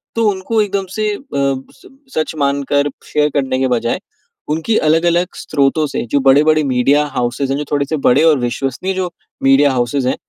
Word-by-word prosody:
तो 225 -2 +2
उनको 205 +3 -1
एकदम 200 -2 -1
से 215 -1 0
अ, - - -10 0.2
स 135 -1 -3 0.3
सच 155 0 -1
मानकर 140 0 0 0.2
शेयर 150 0 +2
करने 130 -2 0
के 130 - +1
बजाय, 120 +3 0 0.5
उनकी 160 +9 0
अलग-अलग 170 +3 +2
स्रोतों 145 +1 0
से - - -3
जो 140 - +3
बड़े-बड़े 150 +3 +4
मीडिया 140 +2 +2
हॉउसेस 125 +2 -1
हैं, 135 - 0
जो 150 - -2
थोड़े 145 -1 +1
से 155 +3 -2
बड़े 140 +1 +3
और 160 -3 +5
विश्वसनीय 135 +9 -2
जो 185 -1 -2 0.3
मीडिया 135 +1 +5
हॉउसेस 125 +2 -1
हैं, 130 - +1
145 Hz, 180 wpm, -16 LUFS, 135-160 Hz, 0.5 s, और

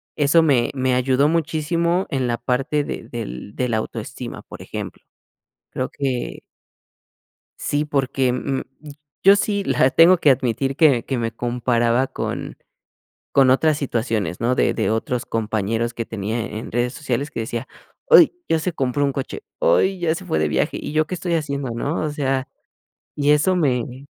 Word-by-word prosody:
eso 150 +2 +4
me 130 -6 +2
me 130 -1 +1
ayudó 130 +2 +2
muchísimo 170 +2 0
en 130 -2 -1
la 120 -1 -1
parte 135 +5 0
de - - -6
del 60 +12 -7
de 125 -1 -1
la 110 - +1
autoestima, 120 +2 -6
por - - -11
ejemplo, - - -7 0.7
creo 130 - -3
que 135 -4 -3 1.2
sí, 145 +1 -1
porque, 135 -3 0
mm, 135 +1 -2 0.6
yo 195 +1 +7
sí 200 0 0
la 130 -3 +3
tengo 170 +4 +6
que 150 - +4
admitir 135 +1 0
que 140 -8 +4
que 130 -3 -2
me 115 -1 -2
comparaba 120 +1 +1
con - - -5 0.8
con 135 -2 +5
otras 150 +3 +3
situaciones, 115 -8 -2
¿no?, 120 +2 +2
de - - +2
de - - 0
otros 115 +2 -2
compañeros 110 +1 -1
que 115 - -3
tenía 110 +1 -3
en 110 +2 -7
redes 120 +1 0
sociales 140 -1 -2
que - - -5
decía: 115 +3 -4 0.4
"Uy, 355 -10 +8 0.2
ya 165 - +2
se 175 +2 -2
compró 135 -1 0
un 140 - +1
coche, 135 - -5 0.2
uy, 350 - +3
ya 165 -2 +1
se - - -7
fue 80 - -1
de 75 -1 +1
viaje, - - 0
¿y - - -6
yo 155 0 +2
qué 185 - -4
estoy 175 -1 -2
haciendo?", 140 -5 -2
¿no?, 140 +7 -2
o 155 - -1
sea, 135 -2 -1 0.7
y 145 0 +2
eso 150 +5 +3
me 130 -4 -1
135 Hz, 170 wpm, -21 LUFS, 120-150 Hz, 1.2 s, Uy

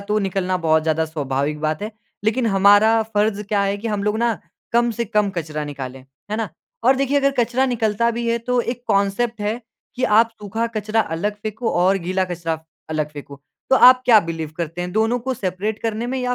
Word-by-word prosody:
तो 210 +1 0
निकलना 190 -2 -1
बहुत 160 0 +4
ज़्यादा 160 0 +1
स्वाभाविक 150 -1 -2
बात 155 +4 -1
है। 215 - -3 0.3
लेक़िन 230 +2 +1
हमारा 205 +3 +5
फ़र्ज़ 210 0 +1
क्या 205 0 0
है 200 0 0
कि 230 - -4
हम 210 -2 -1
लोग 210 +1 0
ना 235 -2 +1 0.3
कम 235 0 +3
से 235 +1 -2
कम 210 -2 +1
कचरा 155 -4 -4
निकालें। 135 -3 -7 0.3
है 215 - -1
ना? 225 -3 -2 0.4
और 260 +1 +5
देखिए 275 +1 +1
अगर 275 0 +3
कचरा 245 +2 +2
निकलता 235 -2 +1
भी 235 0 -3
है 235 - +1
तो 245 +1 0
एक 240 +1 -4
कॉन्सेप्ट 210 +3 +1
है 215 +3 -2 0.4
कि 255 - 0
आप 225 0 +4
सूखा 215 +3 -2
कचरा 215 +1 +1
अलग 205 +3 -2
फ़ेंको, 220 +2 -2
और 185 +3 +3
गीला 185 +2 -1
कचरा 170 -2 -3
आप 160 0 -6 0.2
अलग 155 -1 -1
फ़ेंको। 140 -1 -10 0.3
तो 265 - +6
आप 255 0 +7
क्या 225 -4 +7
बिलीव 165 -3 -5
करते 170 0 -4
हैं? 180 0 -4
दोनों 225 +3 +1
को 260 +2 -3
सेपरेट 200 +1 -3
करने 225 +1 -2
में 260 +1 -2
या 250 0 0
210 Hz, 215 wpm, -21 LUFS, 175-235 Hz, 0.4 s, आप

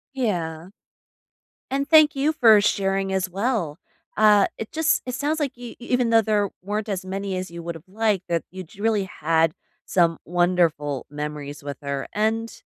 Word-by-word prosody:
Yeah, 175 -8 -2 1.0
and 275 +1 -1
thank 310 -1 +6
you 280 +3 +1
for 225 -7 +6
sharing 195 -1 0
as 190 -1 -1
well. 195 - -1 0.4
Uh, 210 -2 +5
it 220 - -6
just 320 0 +2
it 250 - -3
sounds 300 +4 -1
like 270 -4 -2
you 245 -1 -8
e - - -17
even 245 -1 0
though 225 - +6
there 205 -2 +1
weren't 210 +2 -3
as 190 -2 -2
many 195 0 -3
as 185 0 -4
you 170 0 -8
would 170 0 -5
have 165 +1 -12
liked, 210 -1 0
that 170 -1 0
you'd 185 0 -10
really 215 -2 +1
had 165 -2 +1 0.3
some 170 -3 +2
wonderful 170 -6 +1
memories 150 -1 -6
with 140 -2 -6
her, 140 -1 -3
and 225 - -1
195 Hz, 175 wpm, -23 LUFS, 170-225 Hz, 1.0 s, thank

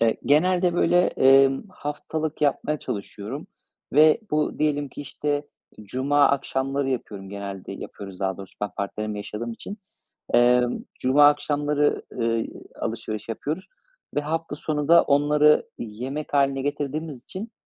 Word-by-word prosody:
Eee, 115 -1 +3
genelde, 175 +4 +3
böyle, 175 0 +4
emm, 135 0 +5
haftalık 155 -2 -4
yapmaya 150 +1 +1
çalışıyorum 100 -2 -6 0.5
ve 155 - +6
bu 150 0 0
diyelim 145 -1 +1
ki, 130 - -9
işte, 145 +1 -3 0.3
cuma 135 +7 +2
akşamları 135 0 -1
yapıyorum 105 -6 -4
genelde 100 -1 -6
yapıyoruz 95 -2 -9
daha 95 -1 -1
doğrusu, 95 -1 -11
ben 105 -1 -2
partnerimle 105 +1 -3
yaşadığım 105 +3 -5
için. 200 - -8 0.6
Emm, 125 0 +4 0.2
cuma 140 +3 +6
akşamları, 145 0 +1
ııı, 115 -1 0 0.4
alışveriş 110 -1 -4
yapıyoruz 150 - -4 0.5
ve 145 - +2
hafta 160 +1 -3
sonu 150 -1 -2
da 170 +1 +8
onları 150 +1 +4
yemek 125 +8 -5
hâline 140 -1 +2
getirdiğimiz 145 -1 -3
için, 210 - -7
140 Hz, 130 wpm, -24 LUFS, 115-150 Hz, 0.6 s, da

